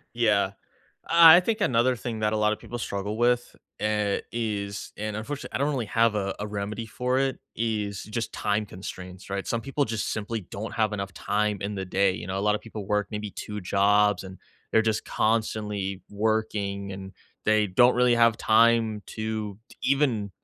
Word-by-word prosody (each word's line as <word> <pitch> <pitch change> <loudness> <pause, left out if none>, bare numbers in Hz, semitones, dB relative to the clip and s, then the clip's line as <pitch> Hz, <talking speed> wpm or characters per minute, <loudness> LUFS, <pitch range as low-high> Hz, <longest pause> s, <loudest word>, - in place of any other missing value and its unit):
Yeah. 105 -5 +3 0.6
I 165 -1 +9
I - - +6
think 215 +4 -1
another 125 - +3
thing 115 -1 -5
that 105 0 +1
a - - +1
lotta 105 0 +2
people 120 - -7
struggle 100 -1 -3
with, 120 +1 +1 0.3
eh, 105 -1 +1
is- 105 -3 -3
and, 105 0 -4
unfortunately, 140 +7 -6
I - - +1
don't 140 +2 +1
really 130 -6 -2
have 115 +1 +2
a 100 -2 -1
a 105 - -3
remedy 105 +2 -4
for 125 +4 -1
it- 135 -1 0 0.2
is 105 -3 -2
just 110 +1 -4
time 105 +1 -1
constraints, 90 0 -9
right? 100 0 -3
Some 115 - -1
people 140 +3 0
just 110 -4 -2
simply 110 +1 -3
don't 100 +5 -7
have 110 -1 +1
enough 100 -2 -4
time 105 0 0
in 100 +1 -3
the 95 - -3
day, 95 +1 +2
you 90 - -6
know, 95 +1 -3
a - - -1
lotta 105 +1 +2
people 105 -3 -8
work 105 0 0
maybe 105 -1 -4
2 105 +1 -6
jobs 100 +1 +3
and 95 -1 -10 0.3
they're 110 - +5
just 110 -1 0
constantly 105 -4 -1
working 105 -2 -1
and 95 0 -8 0.3
they 110 -1 +4
don't 120 +7 +5
really 125 -1 +4
have 115 -1 +4
time 115 -1 +3
to 110 -2 -4
to - - -16
even 130 -7 +1
105 Hz, 190 wpm, -26 LUFS, 100-115 Hz, 0.6 s, I